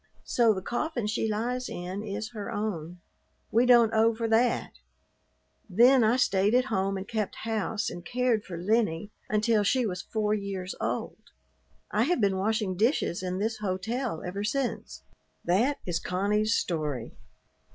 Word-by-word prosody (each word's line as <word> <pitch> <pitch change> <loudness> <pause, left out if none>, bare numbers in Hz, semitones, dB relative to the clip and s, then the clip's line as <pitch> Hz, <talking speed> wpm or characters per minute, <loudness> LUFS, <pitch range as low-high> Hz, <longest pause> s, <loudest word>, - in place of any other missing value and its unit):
So 235 -2 +3
the 190 -3 -2
coffin 240 0 -2
she 220 +1 -1
lies 245 +4 -2
in 180 +3 -5
is 215 +2 -5
her 210 -3 -5
own. 180 -5 -4 0.5
We 235 +3 +3
don't 235 -3 +6
owe 225 +1 +4
for 230 0 -2
that. 230 +2 +2 1.0
Then 240 +6 +6
I 220 +2 +4
stayed 200 -2 +2
at 250 +1 +4
home 195 0 0
and 190 +1 -6
kept 215 -3 -2
house 220 -1 -1
and 175 - -5
cared 245 0 0
for 175 -4 -7
Lennie 205 0 0 0.2
until 215 +1 +2
she 250 +4 +2
was 185 -3 -3
four 215 -1 -1
years 195 -3 -3
old. - - -3 0.7
I 215 +3 +2
have 345 -1 +1
been 200 -3 +2
washing 205 -1 0
dishes 215 - +1
in 185 0 -3
this 220 +3 -2
hotel 210 +1 -2
ever 195 +3 -4
since." 250 +4 -3 0.4
That 230 +12 +2
is 175 -2 -1
Connie's 210 +4 +1
story. 150 -8 -2
215 Hz, 155 wpm, -28 LUFS, 190-230 Hz, 1.0 s, don't